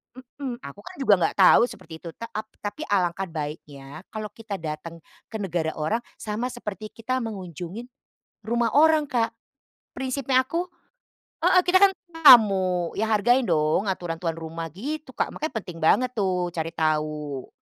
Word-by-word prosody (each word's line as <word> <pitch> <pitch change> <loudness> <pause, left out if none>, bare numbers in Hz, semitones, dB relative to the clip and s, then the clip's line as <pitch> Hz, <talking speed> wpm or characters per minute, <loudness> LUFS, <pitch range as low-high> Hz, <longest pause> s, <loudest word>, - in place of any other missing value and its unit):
mmm, 255 -1 -8
aku 140 +5 -9
kan 205 - -11
juga 270 -6 +3
enggak - - 0
tahu 200 +5 +6
seperti 160 -7 -11
itu, - - -10
ta 230 - -8
ap 215 0 -5 0.2
tapi 300 +10 -5
alangkah 190 -1 0
baiknya 150 -2 -7
kalau 215 -1 -6
kita 220 -3 -7
datang 165 0 -7 0.2
ke - - -11
negara 175 -6 -2
orang 160 +10 0 0.2
sama 215 +3 -3
seperti 215 -4 -6
kita 250 +4 -3
mengunjungin 190 - -6 0.6
rumah 235 0 +1
orang 310 -1 +4
Kak. 230 -2 0 0.6
Prinsipnya 260 0 +1
aku 340 +6 -3 0.7
heeh 365 - +5
kita 370 +1 +4
kan 400 - +7 0.3
tamu. 190 - +7
Ya 220 - +1
hargain 235 +2 +3
dong 155 +5 +2
aturan 175 -3 -3
tuan 165 -2 -2
rumah, 165 0 -6
gitu 275 - -6
Kak, - - -1
makanya 310 -1 -4
penting 170 -2 -9
banget 250 +10 +3
tuh 180 -5 -1
cari 165 -1 -3
tahu. 150 -3 -2
205 Hz, 155 wpm, -25 LUFS, 165-245 Hz, 0.7 s, kan